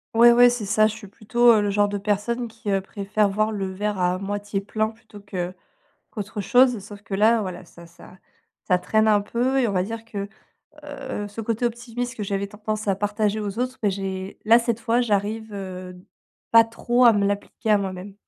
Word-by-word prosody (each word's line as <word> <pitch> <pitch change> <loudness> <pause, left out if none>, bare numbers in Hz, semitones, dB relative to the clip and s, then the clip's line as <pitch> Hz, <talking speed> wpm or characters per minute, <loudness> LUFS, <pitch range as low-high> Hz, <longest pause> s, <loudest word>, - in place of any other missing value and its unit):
Ouais, 235 +1 +8
ouais, 245 +1 +7
c'est 240 -4 -3
ça, 215 +2 +3
je 220 - -4
suis 215 -2 -11
plutôt, 235 +4 +3
heu, 220 - +5
le 205 - 0
genre 205 0 +2
de 205 - -2
personne 210 +4 -1
qui 225 -2 -8
préfère 200 +2 -1
voir 215 +2 0
le 195 -3 -3
verre 205 +1 -3
à 180 0 +1
moitié 205 +1 -3
plein, 215 +2 -1
plutôt 220 -1 -13
que 185 -3 -5 0.6
qu'autre 210 -1 -5
chose, 245 +2 +4
sauf 205 -1 -11
que 200 -1 -7
là, 220 +3 +4
voilà, 185 -2 -6
ça 170 0 -15
ça 170 +2 -16 0.5
ça 180 - +3
traîne 220 +4 +2
un 205 -1 +4
peu 245 +6 0
et 255 - +3
on - - -2
va 185 -2 +1
dire 225 +3 -6
que, 200 -3 -5 0.6
heu, 265 -7 -6
ce 205 +3 -7
côté 230 +2 -2
optimiste 240 +1 -3
que 220 - -6
j'avais 200 0 -2
tendance 215 +1 -5
à 195 - +3
partager 210 +1 -1
aux 205 +1 -4
autres, 255 +1 -2
bah, 210 - +3
j'ai 190 0 -4
là, 225 +2 +7
cette 235 -1 -2
fois, 230 +1 +1
j'arrive, 220 -1 -1
heu, 185 -2 -7 0.5
pas 230 0 +8
trop 240 +2 +2
à 230 - +7
me 205 -1 +1
l'appliquer 205 +3 -3
à 210 - +5
moi-même. 190 0 -5
210 Hz, 210 wpm, -23 LUFS, 200-230 Hz, 0.6 s, Ouais